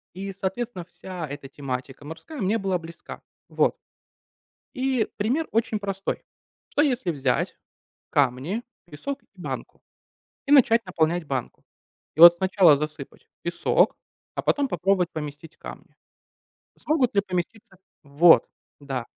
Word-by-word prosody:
И, 195 +1 -5
соответственно, 195 +1 -4
вся 180 -1 -7
эта 140 -1 -8
тематика 135 0 -6
морская 230 - -8
мне 205 +4 +1
была 195 -3 0
близка. 165 0 -10 0.3
Вот. - - +2 1.0
И 260 -3 +1
пример 255 +10 0
очень 220 -1 0
простой: 195 -1 -3 0.5
что, - - +2
если 255 - +1
взять 135 -5 -1 0.5
камни, 140 - 0 0.2
песок 175 - -6
и - - -35
банку, - - -7 0.7
и 280 - +1
начать 235 -5 +6
наполнять 170 -1 0
банку? 130 -4 -4 0.5
И - - -2
вот 170 0 +12
сначала 185 -4 +5
засыпать 150 +1 -7
песок, - - +2 0.4
а - - -3
потом 285 -1 +1
попробовать 180 -2 +1
поместить 150 +1 -7
камни. - - -11 0.8
Смогут 275 -8 +1
ли 200 - +5
поместиться 190 +3 -5 0.3
Вот! 150 +4 +5 0.3
Да. 135 -4 -4
180 Hz, 125 wpm, -25 LUFS, 150-225 Hz, 1.0 s, вот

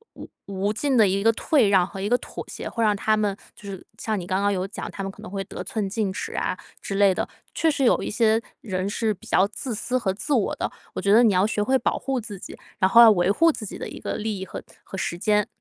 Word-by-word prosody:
无 - - -9 0.2
无 200 +1 -1
尽 270 +2 0
的 215 - +6
一 195 +2 0
个 225 - +6
退 240 -1 +2
让 190 -2 +4
和 195 -1 -8
一 200 - -1
个 245 - +4
妥 - - -8
协， - - -6
会 230 - -2
让 210 -1 +4
他 215 +2 +2
们 210 -2 0 0.2
就 200 - -10
是 190 -2 -8
像 215 -2 -2
你 175 - -7
刚 190 +2 0
刚 205 - +2
有 190 -1 -1
讲， 200 - -7
他 195 - -5
们 195 - -4
可 210 - -15
能 215 - -9
会 195 -1 -3
得 - - -7
寸 210 -3 -2
进 200 -1 -1
尺 - - -5
啊 - - -1 0.2
之 195 - -4
类 200 -1 +5
的。 - - -2 0.3
确 325 - +3
实 275 -3 0
有 - - +3
一 - - -3
些 225 0 +3 0.2
人 190 -2 -2
是 220 +1 0
比 190 - -16
较 195 - +3
自 230 +4 -5
私 250 +4 -1
和 195 -6 0
自 250 +9 -3
我 230 -7 +1
的， - - -1 0.3
我 - - -2
觉 200 +2 +3
得 235 +3 +7
你 220 - +5
要 190 +3 +3
学 215 -2 0
会 260 +4 +2
保 - - 0
护 270 -1 -2
自 210 -4 -8
己， - - -10 0.2
然 190 - +4
后 230 - +6
要 230 - +10
维 180 0 +3
护 330 +9 +4
自 215 - -6
己 - - -7
的 - - -5
一 - - -9
个 - - -3
利 215 -2 -3
益 190 - -5
和 - - -7 0.2
和 195 - -8
时 170 - -2
间。 210 +2 +2
205 Hz, 310 characters per minute, -24 LUFS, 195-225 Hz, 0.3 s, 要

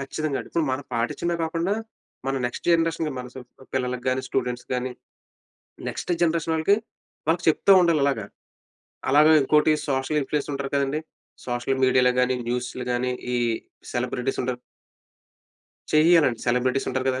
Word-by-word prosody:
ఖచ్చితంగా 140 +1 -2
అండి. - - -10
ఇప్పుడు 165 -2 0
మనం 130 +1 -3
పాటించిందే 120 +9 -1
కాకుండా, 165 +5 -1 0.5
మన 135 - 0
నెక్స్ట్ 120 - -7
జనరేషన్‌కి 165 -2 +1
మన 125 - -5 0.5
పిల్లలకి 125 -1 -2
గాని, 130 +1 0
స్టూడెంట్స్ 125 -1 -2
గాని, 125 0 -2 1.0
నెక్స్ట్ - - -3
జనరేషన్ 165 -1 +1
వాళ్ళకి, 160 +6 +3 0.5
వాళ్ళకి 165 +1 +1
చెప్తా 195 +5 +3
ఉండాలి 165 -4 +3
అలాగ. 135 -6 0 0.9
అలాగే 150 +3 +6
ఇంకోటి 150 +3 +4 0.2
సోషల్ 135 +3 0
ఇన్‌ఫ్లూయన్స్ 145 +2 -2
ఉంటారు 140 0 -4
గదండీ! 140 +2 +1 0.5
సోషల్ 125 +2 -1
మీడియా‌లో 125 -1 +4
గాని, 125 0 +2
న్యూస్‌లో 125 +1 -3
గాని 125 +1 0 0.2
ఈ - - +2 0.6
సెలబ్రిటీస్ 125 +1 -2
ఉంటారు. 125 -1 -2 1.3
చెయ్యాలండి. 155 -6 +5
సెలబ్రిటీస్ 125 +2 +1
ఉంటారు 130 0 -2
కదా. 130 0 -2
135 Hz, 135 wpm, -24 LUFS, 125-155 Hz, 1.3 s, అలాగే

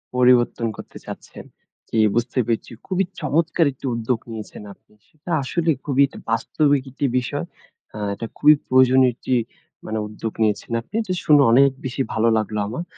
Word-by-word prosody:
পরিবর্তন 125 -2 +3
করতে - - -10
চাচ্ছেন। - - -10 0.4
জ্বি 115 - 0 0.2
বুঝতে 120 +2 0
পেরেছি 115 0 -2 0.2
খুবই 190 0 0
চমৎকার 160 +2 +1
একটি 135 - -12
উদ্যোগ 115 0 -1
নিয়েছেন 110 -1 -8
আপনি। 105 - -30
সেটা 155 +3 -10
আসলে 165 +5 -1 0.2
খুবই 140 -1 +2
একটা - - -12
বাস্তবিক 140 +4 +1
একটি 140 +1 -2
বিষয়। 125 - -2 0.5
আ - - -6 0.2
এটা 115 - -6
খুবই 150 +1 +7
প্রয়োজনীয় 130 0 +5
একটি 130 - -3 0.5
মানে 110 0 -3
উদ্যোগ 110 +1 -6
নিয়েছেন 105 +2 -1
আপনি। 115 - -29
এটা 190 -4 -3
শুনে 150 -2 +6
অনেক 135 +3 +6 0.2
বেশি 130 +1 -2
ভালো 115 +1 +2
লাগলো 110 -1 -2
আমার। 125 +11 -4
125 Hz, 160 wpm, -22 LUFS, 115-145 Hz, 0.5 s, খুবই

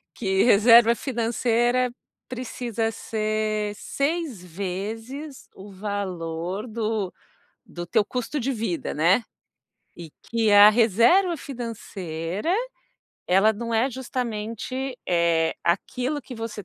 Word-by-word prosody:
que 190 -3 +1
reserva 230 +1 +7
financeira 240 0 +1 0.4
precisa 240 -2 -3
ser 215 -1 -2
6 280 - -2
vezes 220 - -6
o 200 +1 -11
valor 185 -1 -4
do 215 -4 -2 0.6
do 175 - -6
teu 175 +4 +2
custo 250 +5 -3
de 270 +2 -1
vida, 215 -7 -3
né? 180 +9 +3 0.7
E 170 -2 -9
que 225 -2 0
a 205 +1 +10
reserva 235 - +4
financeira, 210 - -4 0.7
ela 195 +4 +4
não 230 +2 -4
é 245 +5 +2
justamente, 250 +1 -4
eh, 170 -2 +2
aquilo 250 - -1
que 255 - -9
você 225 -3 -6
225 Hz, 105 wpm, -24 LUFS, 195-245 Hz, 0.7 s, a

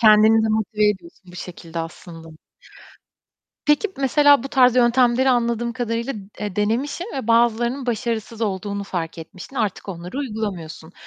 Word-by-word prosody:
kendini 220 0 +6
de 220 - +1
motive 215 -1 +1
ediyorsun 180 -2 -6
bu - - -11
şekilde 170 -2 -8
aslında. 165 0 -8 1.4
Peki, 295 +8 +3
mesela 285 0 +4
bu 275 - -5
tarz 255 -2 +4
yöntemleri 245 +1 +4
anladığım 235 -1 0
kadarıyla, 235 +1 -2 0.3
eee, 205 -2 -4
denemişsin 245 - -1
ve 265 -5 -4
bazılarının 235 +3 +2
başarısız 230 -1 -3
olduğunu 200 -1 -2
fark 170 -4 -4
etmişsin 185 +10 -10
artık 210 -3 -2
onları 180 +6 -6
uygulamıyorsun. 195 - -5
220 Hz, 135 wpm, -22 LUFS, 195-245 Hz, 1.4 s, kendini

